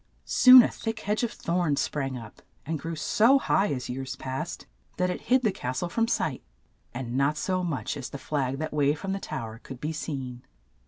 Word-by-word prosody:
Soon 255 -1 +9
a - - +2
thick 225 -1 -4
hedge 210 +1 0
of 240 - -1
thorns 170 -4 0
sprang 135 -3 -2
up, 115 -6 -11 0.2
and 160 +1 -2
grew 165 +3 -4
so 225 - +4
high, 205 -6 +1
as 130 -3 -3
years 130 +1 -4
passed, 130 0 -5 0.3
that 180 0 +1
it - - -5
hid 255 0 +4
the 215 - +3
cas 130 -6 -4
tle 175 - -2
from 230 +5 +1
sight, - - -1 0.5
and 120 -1 -5
not 140 +3 +2
so 185 +3 -1
much 160 -6 -2
as 135 -3 -6
the - - -6
flag 135 -2 -2
that 155 +1 -4
waved 145 0 +2
from 195 +5 -4
the 195 - -2
tow 130 -9 -5
er 110 0 -9
could 130 - -9
be 155 +3 -3
seen. 135 -5 -5
150 Hz, 215 wpm, -27 LUFS, 130-190 Hz, 0.5 s, Soon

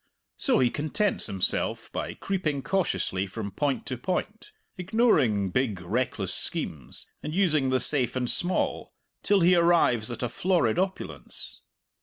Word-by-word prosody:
So - - +3
he 125 -2 +2
contents 170 +7 +1
himself 95 -2 0
by - - -4
creeping 155 -8 -2
cautiously 150 - -1
from 100 +1 -6
point 140 +6 -2
to 130 -2 -4
point, 210 - -4 0.2
ignoring 175 - +2
big, 115 -6 0
reckless 90 0 -2
schemes 70 -6 -4 0.2
and 150 - -5
using 155 -8 +2
the 130 0 +2
safe 130 -2 +2
and 125 -1 -1
small, 175 +8 -1 0.3
till 200 -2 +2
he 175 +2 +5
arrives 170 -10 +3
at 120 - -5
a 120 - -1
florid 170 - +1
opulence. 190 0 -1
145 Hz, 140 wpm, -26 LUFS, 115-185 Hz, 0.3 s, he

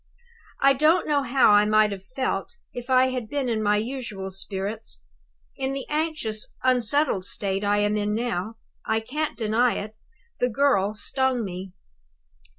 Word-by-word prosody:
I 275 0 +7
don't 305 +6 +3
know 290 -2 +2
how 260 -3 +4
I 205 0 +6
might 215 0 +4
have 195 -1 -6
felt 260 - -3 0.2
if 245 +1 -7
I 260 0 +5
had 250 -4 -4
been 280 -1 -1
in 225 -2 0
my 210 0 +3
usual 215 -5 -4
spirits. 195 - -5 0.5
In 265 0 -2
the 275 -1 -4
anxious, 300 -9 -2
unsettled 255 -3 +2
state 195 0 -2
I 205 0 +2
am 205 0 +1
in 210 0 0
now, 225 -2 -2 0.3
I 220 0 0
can't 290 +7 -3
deny 230 +2 +2
it, 215 +1 -6 0.4
the 245 - +2
girl 215 -5 +2
stung 260 +2 0
me. 185 0 -7
225 Hz, 155 wpm, -25 LUFS, 205-265 Hz, 0.5 s, I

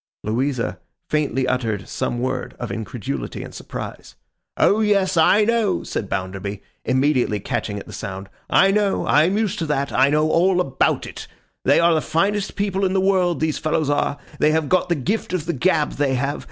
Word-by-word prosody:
Louisa 115 -5 -1 0.3
faintly 135 -4 0
uttered 110 -6 -1
some 120 - -2
word 130 +1 -3
of 120 -4 -5
incredulity 100 - -5
and - - -10
surprise. - - -8 0.4
'O 210 - +4
yes! 200 -3 +2
I 170 +6 +5
know!' 225 -3 +1
said 100 - -4
Bounderby, 95 +2 -4 0.2
immediately 130 -5 +1
catching 100 +1 -3
at 100 - -7
the - - -11
sound. 95 0 -6 0.2
'I 195 - +5
know! 205 -1 +1
I 150 +1 +4
am 190 +4 +1
used 215 -3 -1
to 165 - -2
that. 140 -2 -1
I 135 +2 +4
know 150 +1 +2
all 180 +2 +3
about 135 -7 +1
it. - - -8 0.4
They - - +5
are 170 0 +4
the 155 - +2
finest 195 +7 0
people 200 -1 -1
in 190 -1 +1
the 195 - +2
world, 185 -3 +2
these 155 -1 0
fellows 155 -1 0
are. 145 0 0 0.2
They 150 - +4
have 155 -1 +1
got 185 -1 +2
the 170 - +2
gift 185 - -2
of 175 -4 -1
the 170 - -1
gab, 155 +1 +1
they 140 -2 0
have. 140 +3 -1
150 Hz, 195 wpm, -21 LUFS, 125-185 Hz, 0.4 s, I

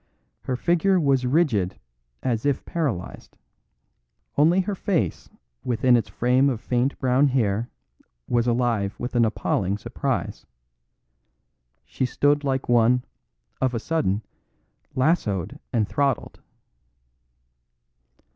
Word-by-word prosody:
Her 130 - -1
figure 175 +6 +2
was 135 -5 +2
rigid 120 - +1 0.4
as 115 -3 -1
if 140 -2 0
paralysed; 140 - -4 1.0
only 165 +6 +4
her 200 +2 -3
face 190 -3 -1 0.3
within 125 +1 +3
its 120 - 0
frame 125 +3 +2
of 120 -5 -2
faint 125 +3 0
brown 130 +2 +3
hair 115 -4 0 0.6
was 120 0 +1
alive 115 -5 0
with 125 - -4
an 120 -2 +4
appalling 100 -3 -1
surprise. - - -3 1.4
She 130 - -2
stood 145 +3 +2
like 135 -1 -1
one 120 +1 +3 0.6
of 130 -2 +1
a - - -1
sudden 110 -8 -1 0.7
lassooed 130 - 0
and 110 -3 +1
throttled. 140 -2 -1
125 Hz, 110 wpm, -24 LUFS, 115-145 Hz, 1.4 s, only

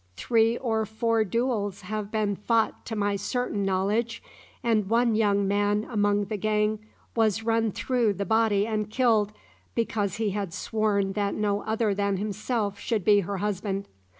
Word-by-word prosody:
"Three 230 0 +2
or 225 -3 0
four 225 0 +1
duels 215 -2 -1
have 210 +1 -4
been 210 -2 0
fought 225 +2 0
to 225 - -3
my 205 -1 0
certain 245 -2 -2
knowledge, 205 +5 0 0.4
and 215 -4 +1
one 235 0 +3
young 200 -2 +2
man 205 +1 +1
among 205 -2 +1
the 210 +1 -3
gang 215 +1 +1 0.4
was 225 -1 +2
run 225 -1 +1
through 240 -1 +1
the 200 +1 -3
body 220 -2 +2
and 215 -2 -2
killed, 220 -3 +2 0.4
because 210 -4 -1
he 220 -2 -1
had 195 -3 -3
sworn 205 -3 0
that 200 -1 -1
no 205 -1 0
other 220 -1 +1
than 200 0 0
himself 210 0 -2
should 215 -6 -1
be 205 -1 +6
her 200 +1 -3
husband. 200 0 -2
210 Hz, 160 wpm, -26 LUFS, 200-225 Hz, 0.4 s, be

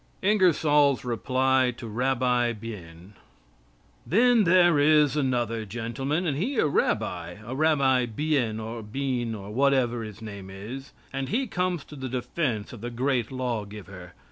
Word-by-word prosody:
INGERSOLL'S 150 -9 +3
REPLY 130 +1 +1
TO 115 - -7
RABBI 125 +1 +1
BIEN 100 -5 -10 0.9
Then 230 +3 +4
there 175 -3 +5
is 150 0 +4
another 120 -5 0
gentleman, 120 - -3
and 150 -5 0
he 250 - -1
a - - +3
rabbi, 90 - -1
a 120 - -5
Rabbi 135 -4 +3
Bien, 120 -3 -1
or 115 +1 -5
Bean, 120 0 -2
or 100 0 -8
whatever 130 -1 +2
his 110 -2 -8
name 100 -4 -8
is, 115 +8 -8 0.2
and 135 0 -3
he 255 +5 0
comes 180 - -1
to 150 - -12
the 130 -2 -5
defense 125 -3 -2
of 115 - -10
the 120 - -4
Great 125 -1 -1
Law 125 -4 -2
giver. 100 -3 -11
130 Hz, 145 wpm, -26 LUFS, 115-145 Hz, 0.9 s, there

